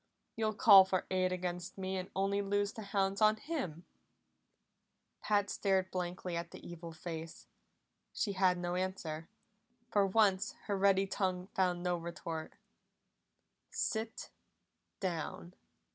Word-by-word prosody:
You'll 220 -1 0
call 200 -3 +9
for 190 -1 -1
aid 185 -1 +2
against 180 0 -4
me 190 0 -3
and 185 0 -4
only 195 +1 +1
loose 205 0 0
the 220 - -8
hounds 195 0 0
on 215 0 +6
him." 215 - -4 1.4
Pat 205 -1 +2
stared 190 -2 +1
blankly 180 -1 -3
at 170 0 -3
the - - -11
evil 170 -1 -8
face. 160 0 -7 0.7
She 205 - -1
had 185 -2 +3
no 175 0 -2
answer; 180 -4 -3 0.6
for 200 -1 +4
once 195 -1 +3
her 205 - -1
ready 195 0 +4
tongue 185 -1 -2
found 180 -2 +1
no 180 -1 +1
retort. 165 -1 -5 1.2
"Sit 220 0 -3 0.7
down!" 175 -1 -3
185 Hz, 130 wpm, -34 LUFS, 175-200 Hz, 1.4 s, call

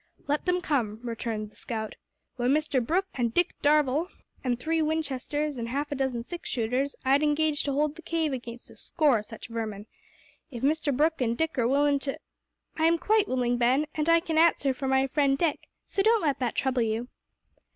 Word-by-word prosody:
"Let 295 +1 -1
them 360 0 +1
come," 235 - -1
returned 225 -3 -4
the - - -24
scout. 220 -2 -4 0.5
"Wi' 245 - +1
Mr 285 -2 +2
Brooke, 355 +10 +1
an' 245 -2 0
Dick 345 +10 +1
Darvall, 295 +2 +3 0.4
an' 245 -2 0
three 320 +6 0
Winchesters, 300 -2 -2
an' 230 - -3
half 285 +5 -2
a - - -1
dozen 260 -3 -1
six 345 +7 -7
shooters, 255 +4 -1
I'd 275 +2 +4
engage 300 0 +2
to 285 - 0
hold 295 +2 +1
the 330 - -12
cave 325 -3 -1
against 240 -1 -7
a - - -16
score 295 -8 +2
o' - - -4
such 215 +1 -10
varmin. 215 -3 -4 0.6
If 245 -4 -8
Mr 300 +1 +2
Brooke 305 +3 +1
an' 235 -1 +1
Dick 320 +4 -1
are 235 - +3
willin' 285 +2 +3
to 275 0 -3 0.3
" - - -31
"I 320 - +3
am 335 +1 +4
quite 425 +3 +2
willing, 245 -1 0
Ben, 255 +5 +3
and 310 +1 0
I 335 0 +5
can 325 -2 0
answer 320 -5 +4
for 270 +1 -4
my 265 0 +3
friend 275 0 +2
Dick, 320 0 -1 0.2
so 390 - -1
don't 445 0 +3
let 290 -3 +1
that 245 -3 -1
trouble 260 -2 +1
you." 225 +2 -1
280 Hz, 205 wpm, -27 LUFS, 245-315 Hz, 0.6 s, I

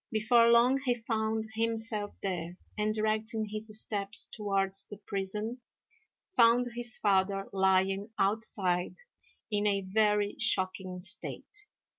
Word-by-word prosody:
Before 230 +2 +4
long 240 +3 +5
he 250 -2 +1
found 220 -1 -2
himself 225 -2 -2
there, 175 -2 -3 0.2
and, 215 0 0
directing 220 0 0
his 215 0 -4
steps 200 -2 0
towards 195 -2 0
the 205 - -9
prison, 210 +5 -4 0.7
found 240 +1 +5
his 240 -1 -1
father 195 0 +1
lying 190 +1 +2
outside 195 -3 +1 0.6
in 210 0 +1
a 200 -1 +1
very 210 +1 +1
shocking 185 -1 +1
state. 410 - -5
210 Hz, 115 wpm, -30 LUFS, 195-225 Hz, 0.7 s, long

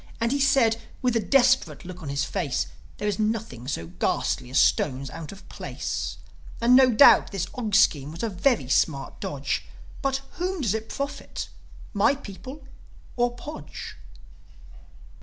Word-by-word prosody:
And 230 +1 +1
he 280 - +1
said, 265 -5 +3 0.2
with 250 -2 +2
a - - +4
desperate 245 - +3
look 180 0 -8
on 150 - -6
his 140 0 0
face, 170 -9 -1 0.3
"There 210 - -2
is 205 -1 -1
nothing 215 - -2
so 85 - -3
ghastly 90 +7 -1
as 130 - -1
stones 135 -1 +2
out 160 -2 -7
of 200 0 -13
place. - - -4 0.4
And, 240 +2 +5
no 260 0 +7
doubt, 240 +3 +7
this 195 -4 -2
Og 220 -5 -2
scheme 150 -9 +4
was 165 +5 -7
a 230 - 0
very 205 - +1
smart 140 +1 0
dodge. 140 -1 -2 0.4
But 270 -1 0 0.2
whom 365 0 -2
does 220 -7 +1
it 220 0 -4
profit 280 0 -5 0.4
my 210 +6 +3
people, 260 +3 -10 0.5
or 240 0 +1
Podge?" 300 +5 -8
215 Hz, 160 wpm, -25 LUFS, 160-255 Hz, 0.5 s, no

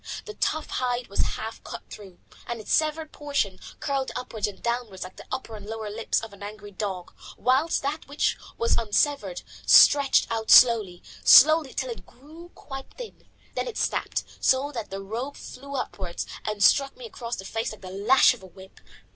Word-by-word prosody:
The 425 - -7
tough 315 -6 -1
hide 245 -1 -2
was 200 - -6 0.2
half 220 +1 -7
cut - - -8
through, 195 -4 -11 0.3
and 235 -1 -4
its 215 - -3
severed 310 0 +1
portion 280 -11 -2 0.2
curled 275 -2 -1
upwards 220 -4 -3
and 205 - -9
downwards 235 -5 -3
like 185 0 -11
the - - -12
upper 230 -4 -5
and 210 - -10
lower 220 -1 -5
lips 225 +2 -1
of 225 -2 -9
an 200 - -15
angry 205 0 -8
dog, 190 -3 -5 0.2
whilst 270 +6 +1
that 290 +3 -3
which 285 +2 0 0.2
was 230 - +1
unsevered 215 -3 0 0.2
stretched 280 -2 +6
out 225 -1 -3
slowly, 220 -8 +6 0.2
slowly, 310 0 +7
till - - -2
it 460 - -9
grew 315 +6 -14
quite 270 -1 -9
thin. - - -10 0.3
Then - - -2
it 480 - -6
snapped, - - -1 0.2
so 270 +2 +2
that 230 -6 -6
the 195 0 -6
rope 235 +8 -5
flew 280 +2 -9
upwards 190 -8 -4 0.2
and 210 -1 -1
struck 275 +3 +4
me 250 - -9
across 235 +2 -6
the 190 - -8
face 225 +3 -3
like 215 - -11
the 185 -1 -9
lash 210 +9 +5
of 245 - -13
a 190 - -12
whip. 190 +1 -15
235 Hz, 190 wpm, -26 LUFS, 205-280 Hz, 0.3 s, slowly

